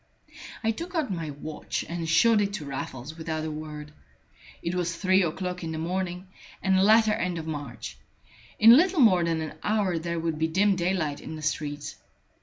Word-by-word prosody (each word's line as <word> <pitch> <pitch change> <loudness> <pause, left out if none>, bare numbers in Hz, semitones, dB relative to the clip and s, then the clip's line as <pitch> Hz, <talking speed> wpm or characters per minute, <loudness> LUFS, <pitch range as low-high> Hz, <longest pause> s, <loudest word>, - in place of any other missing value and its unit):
I 225 - +2
took 340 +10 -7
out 305 -9 0
my 165 -3 -4
watch 150 +2 -5
and 170 -1 -4
showed 220 +6 +5
it 200 0 -1
to 190 -8 -5
Raffles 135 +1 -6
without 160 -1 -3
a 160 - -3
word. 150 -1 -7 0.7
It 170 - -2
was 175 -2 -1
three 190 +1 +3
o'clock 180 +1 -2
in 160 - -3
the - - -4
morning, 180 +2 -3 0.4
and 190 0 +3
the 190 - +4
latter 215 +2 +5
end 180 -4 -1
of 160 - -5
March. 145 -6 -6 0.6
In 225 +2 +9
little 355 +4 +4
more 190 -9 +6
than 165 -1 0
an 155 0 -6
hour 205 -5 +1
there 170 +1 -3
would 165 -1 -2
be 160 - +2
dim 195 +4 +3
daylight 175 -5 -1
in 160 - -7
the 155 - -8
streets. 145 -1 -3
170 Hz, 195 wpm, -27 LUFS, 155-195 Hz, 0.7 s, In